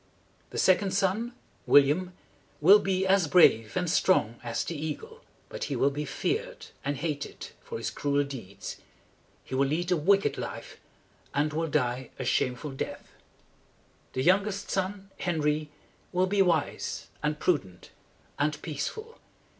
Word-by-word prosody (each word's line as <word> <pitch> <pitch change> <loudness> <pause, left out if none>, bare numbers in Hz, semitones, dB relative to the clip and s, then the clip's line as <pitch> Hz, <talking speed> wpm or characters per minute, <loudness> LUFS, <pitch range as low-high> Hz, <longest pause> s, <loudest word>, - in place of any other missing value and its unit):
"The - - -7
second 190 +1 +3
son, 210 +5 0 0.3
William, 150 +6 +4 0.5
will 195 +7 +8
be 190 -1 0
as 190 -3 +4
brave 115 -8 +5
and 180 -1 0
strong 155 - +2
as 115 -1 -2
the 170 - -4
eagle; 445 - -6 0.3
but - - -5
he - - -3
will 140 - +3
be 150 +2 -3
feared 455 - -3 0.2
and 140 0 -1
hated 150 -1 -4
for - - -6
his - - -3
cruel 145 0 +1
deeds. 115 -8 -7 0.7
He - - -10
will 135 +1 +2
lead 170 +5 -1
a - - +5
wicked 195 +5 +2
life, - - -6 0.6
and 150 +2 +1
will 165 +1 0
die 130 -4 -1
a - - -4
shameful 130 +4 0
death. 135 - -6 1.0
"The 130 - -1
youngest 200 +4 +2
son, 195 +1 -2
Henry, 155 -3 0 0.4
will 185 0 +2
be 195 +1 +2
wise 170 -5 0 0.2
and 150 0 -1
prudent 95 - -1 0.5
and 150 +1 0
peaceful. 435 - -5
160 Hz, 145 wpm, -28 LUFS, 140-190 Hz, 1.0 s, will